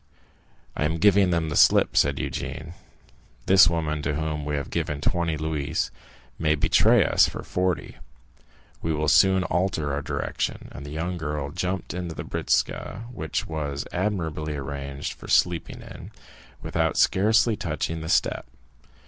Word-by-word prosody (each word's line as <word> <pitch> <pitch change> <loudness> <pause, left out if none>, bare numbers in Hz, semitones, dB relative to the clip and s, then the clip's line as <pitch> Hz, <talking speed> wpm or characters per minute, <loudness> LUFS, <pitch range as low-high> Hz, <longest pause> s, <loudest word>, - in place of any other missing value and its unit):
"I - - -1
am 80 +2 0
giving 100 +1 +4
them 85 -2 0
the 75 - -3
slip," - - +5
said 70 0 +3
Eugénie; 75 +5 -5 0.7
"this 95 -1 +7
woman 80 -3 -1
to 75 - -1
whom 75 -1 -3
we 75 0 -2
have 70 -1 -4
given 75 -1 -2
twenty 85 0 0
louis 80 0 -2 0.5
may 80 -1 +2
betray 75 - +4
us - - +4
for - - -7
forty; 90 0 -2 0.8
we 80 - -1
will 75 +1 -1
soon 95 +5 +5
alter 85 -5 -1
our 70 - -1
direction." - - -3
And 70 +2 -9
the - - -7
young 85 +4 -3
girl 75 -2 -3
jumped 90 +1 -3
into 90 -2 -5
the - - -5
britzka, 110 - -1
which 80 -9 -3
was 70 -3 -4
admirably 80 -6 -2
arranged 70 0 -5
for - - -13
sleeping 85 -2 +1
in, - - -10 0.5
without 80 -2 0
scarcely 110 +3 +3
touching 80 -4 -3
the 80 - -5
step. - - +1
80 Hz, 150 wpm, -25 LUFS, 75-90 Hz, 0.8 s, this